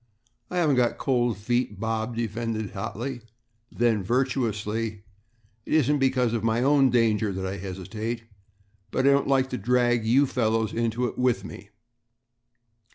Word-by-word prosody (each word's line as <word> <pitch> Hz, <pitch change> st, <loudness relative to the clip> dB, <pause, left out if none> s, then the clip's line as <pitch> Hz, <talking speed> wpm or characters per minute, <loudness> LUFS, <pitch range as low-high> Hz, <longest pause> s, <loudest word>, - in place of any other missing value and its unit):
"I 180 Hz, -, -4 dB
haven't 155 Hz, -6 st, +3 dB
got 120 Hz, -1 st, +2 dB
cold 120 Hz, -5 st, +1 dB
feet," 110 Hz, -1 st, -1 dB
Bob 110 Hz, +1 st, -2 dB
defended 115 Hz, -1 st, -3 dB
hotly, 125 Hz, +3 st, -5 dB, 0.5 s
then 115 Hz, -3 st, +1 dB
virtuously, 110 Hz, -2 st, -1 dB, 0.6 s
"it -, -, -4 dB
isn't 150 Hz, -1 st, +3 dB
because 130 Hz, -3 st, +2 dB
of 115 Hz, -2 st, -1 dB
my 115 Hz, +2 st, +1 dB
own 140 Hz, -1 st, +4 dB
danger 115 Hz, -3 st, +2 dB
that 95 Hz, 0 st, -4 dB
I 95 Hz, +1 st, -3 dB
hesitate, 105 Hz, +5 st, -5 dB, 0.7 s
but 130 Hz, -, 0 dB
I 140 Hz, -, +6 dB
don't 140 Hz, 0 st, +2 dB
like 135 Hz, -1 st, +2 dB
to 125 Hz, -, -3 dB
drag 120 Hz, +1 st, +2 dB
you 125 Hz, +6 st, +4 dB
fellows 110 Hz, -4 st, 0 dB
into 115 Hz, +1 st, 0 dB
it 120 Hz, -, -4 dB
with 120 Hz, -6 st, +1 dB
me." 100 Hz, -1 st, -10 dB
115 Hz, 150 wpm, -26 LUFS, 110-125 Hz, 0.7 s, I